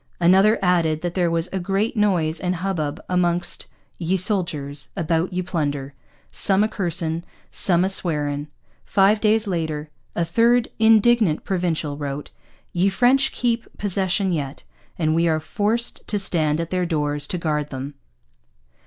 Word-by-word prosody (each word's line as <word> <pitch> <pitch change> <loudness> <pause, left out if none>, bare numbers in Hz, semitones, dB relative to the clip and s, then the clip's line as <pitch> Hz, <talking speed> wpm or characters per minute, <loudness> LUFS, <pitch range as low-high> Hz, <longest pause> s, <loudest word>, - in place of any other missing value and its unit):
Another 190 +5 +5
added 165 -4 +2
that 175 -1 -3
there 175 -2 +1
was 165 +1 0
'a 190 - -1
great 195 +6 -1
Noys 175 -7 +1
and 180 0 -1
hubbub 170 -5 -3
a 180 - -2
mongst 175 -1 0 0.3
ye 180 +2 0
Solders 170 -7 -1
a 170 - -1
bout 165 +3 0
ye 185 0 -2
Plunder: 145 -5 -3 0.4
Som 195 +1 +5
a - - +2
Cursing, 170 -5 -2 0.3
Som 180 -1 +3
a - - +2
Swarein.' 150 -6 -1 0.4
Five 205 +2 +3
days 220 +1 +3
later 160 -5 -3 0.2
a 170 - 0
third 230 +7 +3
indignant 220 -5 +4
Provincial 165 -6 -2
wrote: 145 0 -5 0.4
'Ye 180 +3 +2
French 250 +7 +3
keep 235 -1 -1
possession 190 -1 0
yet, 145 -5 -4 0.3
and 155 -2 +1
we 165 +1 +2
are 160 -1 +1
forsed 220 +7 -1
to 210 - 0
stand 160 -6 +1
at 165 0 -4
their 180 -1 0
Dores 145 -3 -1
to 180 - -3
gard 150 -3 -2
them.' 135 +2 -6
175 Hz, 155 wpm, -22 LUFS, 155-195 Hz, 0.4 s, Another